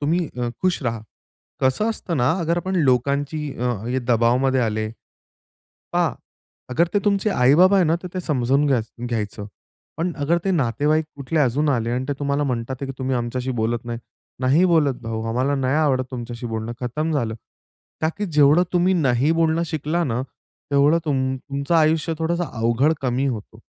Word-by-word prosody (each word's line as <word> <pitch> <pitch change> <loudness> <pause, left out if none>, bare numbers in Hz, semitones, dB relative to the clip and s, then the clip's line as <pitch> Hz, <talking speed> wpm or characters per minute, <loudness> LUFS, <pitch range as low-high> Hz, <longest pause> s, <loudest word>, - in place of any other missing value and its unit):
तुम्ही 160 +3 0
अ, 120 - 0
खुश 185 -4 +1
राहा." 115 -3 -2 0.6
कसं 135 - +2
असतं 180 -6 -3
ना, 125 -2 +3
अगर 170 +1 0
आपण 185 +2 -2
लोकांची 140 +1 +1 0.2
अ, 125 0 0 0.3
दबावामध्ये 125 +3 +3
आले 110 -2 -1 1.1
पहा, - - +2 0.6
अगर 165 +7 +2
ते 205 - +3
तुमचे 200 +1 +2
आई-बाबा 175 +6 +5
आहे 185 - +4
ना, 160 +1 +2
तर - - -4
ते 185 - -2
समजून 140 -2 +1
घ्याय 130 -5 +2 0.3
घ्यायचं. 105 -3 -3 0.5
पण 175 +2 -1
अगर 150 +4 +2
ते 195 - +2
नातेवाईक 150 - +1
कुठले 145 +3 -2
अजून 145 +2 +2
आले 120 -4 0
आणि 125 +2 -1
ते 145 - 0
तुम्हाला 140 0 0
म्हणतात 125 -1 -2
की 135 - -4
"तुम्ही 130 0 -1
आमच्याशी 125 +2 -2
बोलत 115 +1 -1
नाही." 120 -1 -4 0.4
नाही 135 +7 +4
बोलत 160 -6 +3
भाऊ, 115 -1 -4
आम्हाला 130 +5 +1
नाही 135 0 0
आवडत 140 -5 +2
तुमच्याशी 120 -1 -6
बोलणं 110 0 -4
खतम 150 +6 -2
झालं. 120 -7 -1 0.7
का 160 - +2
की 205 - -1
जेवढं 150 0 +4
तुम्ही 180 +1 +3
नाही 140 -3 +2
बोलणं 165 0 +2
शिकला 160 +2 -1
ना, 125 -4 -1 0.5
तेवढं 145 +3 +4
तुम 130 -3 0
तुमचं 140 +4 -2
आयुष्य 160 +1 +2
थोडंसं 170 +2 0
अवघड 120 +6 +2
कमी 130 +1 0
होतो. 110 -6 -5
140 Hz, 170 wpm, -22 LUFS, 125-160 Hz, 1.1 s, आई-बाबा